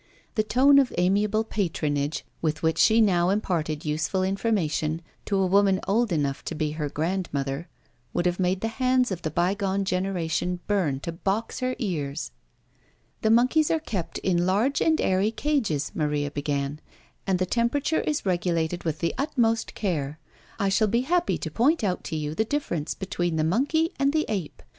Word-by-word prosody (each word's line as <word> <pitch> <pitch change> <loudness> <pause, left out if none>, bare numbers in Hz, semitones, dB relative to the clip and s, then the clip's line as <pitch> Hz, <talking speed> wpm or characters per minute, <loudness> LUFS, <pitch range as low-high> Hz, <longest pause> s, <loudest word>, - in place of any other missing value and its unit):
The 220 - +2
tone 265 +6 +5
of 270 -2 +2
amiable 205 +4 +2
patronage 155 -8 -2 0.2
with 155 -1 -1
which 160 0 +1
she 225 +1 +5
now 180 -4 +3
imparted 165 -7 -1
useful 160 +5 0
information 175 -6 0 0.2
to 200 - 0
a 190 - +3
woman 195 0 +3
old 220 +2 +2
enough 145 -4 -1
to 165 - -4
be 155 -1 -1
her 150 -1 -3
grandmother, 155 -3 -2 0.4
would 175 - -1
have 180 +1 +1
made 185 +1 +1
the 225 - 0
hands 255 0 +1
of 180 -2 -3
the 160 - -2
bygone 190 +4 0
generation 180 -2 -1
burn 170 -10 0
to 170 - -4
box 195 +6 -2
her 255 0 -1
ears. 145 - -3 0.9
"The 220 - +2
monkeys 255 +7 +4
are 325 - +2
kept 190 - -4
in 175 -2 +1
large 220 +9 +2
and 320 -1 +3
airy 190 +3 +2
cages," 225 - -1
Maria 150 -2 -1
began; 145 0 -2 0.5
"and 190 -1 +2
the 185 - 0
temperature 250 - +1
is 300 -6 -2
regulated 175 -2 0
with 160 -2 -3
the 170 - 0
utmost 235 -6 0
care. 155 -8 -2 0.4
I 200 -2 +1
shall 215 +3 +3
be 235 +4 +2
happy 345 +6 +1
to 160 - -5
point 265 - +2
out 185 -3 -1
to 160 - -4
you 150 -1 -2
the 220 - +1
difference 215 - -2
between 175 -3 -2
the 155 - +1
monkey 285 - +1
and 275 +1 +2
the 310 0 +2
ape. 190 -8 -4
185 Hz, 175 wpm, -26 LUFS, 160-225 Hz, 0.9 s, tone